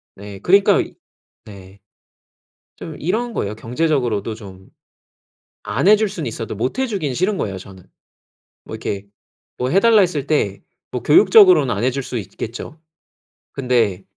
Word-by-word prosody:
네 100 0 -10
그러니까 195 - +4 0.7
네. 100 -1 -13 1.0
좀 160 -3 -8
이런 225 +8 -2
거예요. 105 +1 -3
경제적으로도 120 -5 -1
좀 95 -3 -13 1.0
안 185 - 0
해 215 - +8
줄 215 -2 -1
수는 165 - -5
있어도 115 -1 -6
못 125 - -3
해 265 - +1
주기는 175 - -3
싫은 190 +6 0
거예요 100 -2 -3
저는. 95 -1 -12 0.8
뭐 - - -9
이렇게 100 0 -5 0.5
뭐 125 - -1
해 195 - +4
달라 230 -1 +5
했을 160 -7 0
때 105 -11 -1 0.3
뭐 125 - -4
교육적으로는 180 - +6
안 105 +5 -2
해 130 - +3
줄 140 - -3
수 125 - -6
있겠죠. 120 +9 -8 0.7
근데 115 -8 0
130 Hz, 280 characters per minute, -19 LUFS, -, 1.0 s, 해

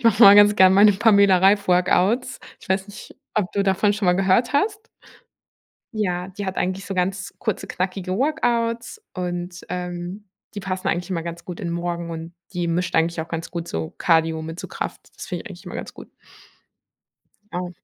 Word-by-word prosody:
ich - - -16
mache 225 -3 +5
mal 200 0 +11
ganz 205 0 +7
gerne 190 0 +7
meine 205 +1 +7
Pamela-Reif-Workouts. 200 +2 +3 0.2
Ich - - -16
weiß 190 +1 0
nicht, 205 - -11 0.2
ob 205 -4 0
du 200 - +1
davon 195 +1 +2
schon 205 -2 -2
mal 180 - +5
gehört 195 +6 +2
hast. 415 +9 +1 1.1
Ja, 180 -4 -1
die 195 +1 -6
hat 190 - -4
eigentlich 185 +1 -2
so 195 - -4
ganz 185 +1 -2
kurze, 220 - -2
knackige 185 0 -3
Workouts 240 - -1
und, 175 -1 -4
ähm, 180 +2 -5 0.3
die 205 - -4
passen 185 -1 -3
eigentlich 180 +3 -2
immer 170 -3 -2
ganz 170 0 -7
gut 175 -2 -7
in 170 - -3
Morgen 170 0 -3
und 165 +1 -7 0.2
die 175 -1 -2
mischt 175 +2 -1
eigentlich 165 0 +1
auch 160 - -6
ganz 165 0 -5
gut 170 -1 -5
so 80 -1 -4
Cardio 160 -1 +2
mit 160 +2 -7
so - - -6
Kraft. - - -6
Das - - -8
finde - - -4
ich - - -8
eigentlich - - -12
immer - - -8
ganz - - -7
gut. - - -12 1.4
Ah. 180 0 -3
185 Hz, 190 wpm, -22 LUFS, 175-205 Hz, 1.4 s, mal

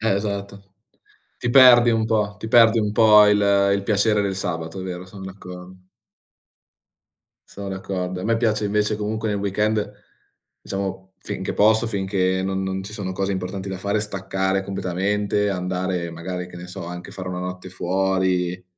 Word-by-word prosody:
Eh 110 -1 +1
esatto. 100 -1 -5 0.6
Ti 120 - -2
perdi 120 -2 +8
un 115 -1 +1
po', 105 -3 0
ti 110 - -6
perdi 115 0 +6
un 105 -1 0
po' 105 -1 +7
il 105 0 +4 0.4
il 100 - -1
piacere 105 0 +2
del 100 -1 -1
sabato, 80 -1 -4
è - - -5
vero, 90 0 -6
sono 95 +1 -10
d'accor 90 -1 -10 1.8
Sono 100 0 -7
d'accordo. 95 -1 -4
A - - -6
me 115 +2 +1
piace 110 -2 +1
invece 105 +1 +1
comunque 110 +1 -3
nel 100 -1 -1
weekend, 105 +2 0 0.7
diciamo, 95 -1 -5
finché 95 -1 -5
posso, 110 +2 +3
finché 95 -2 0
non 95 0 -1
non 95 0 -3
ci 105 +2 -9
sono 100 -3 -4
cose 95 +1 -2
importanti 95 +1 -4
da 95 -1 -5
fare, 100 +2 0
staccare 95 -1 -1
completamente, 100 +2 -1
andare 90 -2 -2
magari 90 +2 -5
che 90 0 -11
ne 90 +1 -9
so, 95 +1 -7
anche 90 0 -7
fare 95 -2 -7
1 90 -1 -4
notte 90 0 -6
fuori 90 -1 0
95 Hz, 165 wpm, -22 LUFS, 95-105 Hz, 1.8 s, perdi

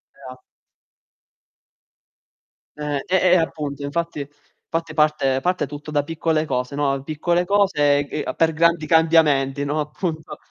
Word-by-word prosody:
E - - -24
a 130 0 -12 2.4
Eh. 145 -2 -3
E 185 - 0 0.2
e - - +7
appunto 150 -4 -2
infatti 165 +3 -3 0.5
infatti 165 -1 -2
parte 150 -4 +1
parte 180 +5 0
tutto 150 +1 -8
da 145 -1 +1
piccole 160 0 -1
cose, 125 0 -3
no? 140 -2 0
Piccole 170 +4 0
cose 180 -8 +3
e 145 - -2 0.2
g - - -4
per 160 -1 +2
grandi 170 0 +2
cambiamenti, 150 -4 +3
no, 150 +2 -1
appunto. 155 +1 -4
150 Hz, 135 wpm, -21 LUFS, 145-165 Hz, 2.4 s, e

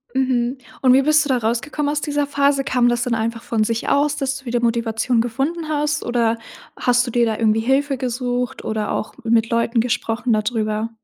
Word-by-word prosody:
Mhm. 255 -1 +1 0.2
Und 255 -2 +5
wie 265 - +6
bist 305 +1 +3
du - - -5
da 260 - +3
rausgekommen 245 +6 -1
aus 295 0 -1
dieser 290 -1 0
Phase? 280 -1 +2
Kam 250 -2 +2
das 240 0 +1
dann 245 - -1
einfach 230 +1 -3
von 220 -2 0
sich 230 +1 -2
aus, 290 +1 +2
dass 275 -2 -2
du 270 - -20
wieder 240 0 -1
Motivation 230 0 0
gefunden 275 +8 -2
hast, 300 0 -1
oder 230 -1 +1 0.4
hast 245 0 +3
du 245 - -5
dir 240 0 +3
da 220 -2 -1
irgendwie 220 -1 +2
Hilfe 270 +4 +1
gesucht 245 -1 -3
oder 215 -1 -2
auch - - -3
mit 230 0 +2
Leuten 230 0 +1
gesprochen 235 0 -1
da 215 - +2
drüber? 215 0 -2
245 Hz, 205 wpm, -20 LUFS, 230-275 Hz, 0.4 s, wie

